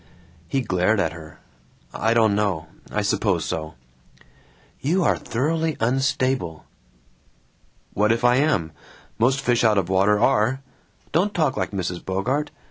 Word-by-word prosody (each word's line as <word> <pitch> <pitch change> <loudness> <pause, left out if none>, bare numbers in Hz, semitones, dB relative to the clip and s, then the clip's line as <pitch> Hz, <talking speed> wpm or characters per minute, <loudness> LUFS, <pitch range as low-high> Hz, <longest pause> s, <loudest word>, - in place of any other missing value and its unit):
He 135 - 0
glared 100 -1 +1
at 80 -4 0
her. 80 -1 -12 0.5
"I 115 +2 +1
don't 110 -3 +4
know. 100 -6 0 0.3
I - - -1
suppose - - 0
so." 80 0 -4 1.0
"You 175 +7 +1
are - - +3
thoroughly 160 +5 -1
unstable!" 130 - 0 1.3
"What 105 +2 +2
if 115 +1 0
I 125 0 +5
am? 130 - +1 0.5
Most 130 +4 +2
fish 120 -3 +1
out 110 -2 +4
of 95 -2 0
water 100 +2 +3
are! 130 +2 +2 0.5
Don't 190 +6 +1
talk 155 -5 +1
like - - -2
Mrs. 90 -3 -4
Bogart! 125 +11 -1
115 Hz, 135 wpm, -23 LUFS, 95-135 Hz, 1.3 s, I